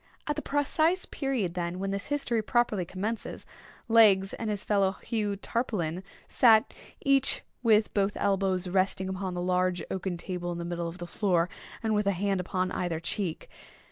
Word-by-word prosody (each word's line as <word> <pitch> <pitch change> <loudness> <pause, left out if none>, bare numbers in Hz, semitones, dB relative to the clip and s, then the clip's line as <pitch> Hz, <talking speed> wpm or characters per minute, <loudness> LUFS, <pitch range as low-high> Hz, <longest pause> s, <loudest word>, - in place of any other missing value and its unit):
At 295 - -1
the 300 - -3
precise 315 +6 +1
period, 255 - -2
then, 175 0 -3
when 195 +1 -2
this 200 +1 -3
history 275 -6 0
properly 215 -4 +1
commences, 205 +6 -4 0.4
Legs, 210 -4 +5
and 225 - -4
his 205 -2 -2
fellow 195 -2 +2
Hugh 210 0 -2
Tarpaulin, 190 -6 -2 0.3
sat, 225 -3 +5 0.3
each 275 -1 +4 0.2
with 220 -3 +3
both 200 0 +1
elbows 195 -2 +1
resting 190 +1 0
upon 190 -1 -3
the 175 - -2
large 180 -1 +1
oaken 190 -2 -2
table 175 0 -4
in 170 - -4
the 170 - -4
middle 170 0 -3
of 165 +1 -7
the 175 - -6
floor, 175 -2 +1 0.3
and 220 -1 +1
with 210 -1 +1
a 200 - +3
hand 195 +1 0
upon 185 0 -1
either 170 -3 -2
cheek. 170 0 -3
195 Hz, 170 wpm, -28 LUFS, 180-220 Hz, 0.4 s, Legs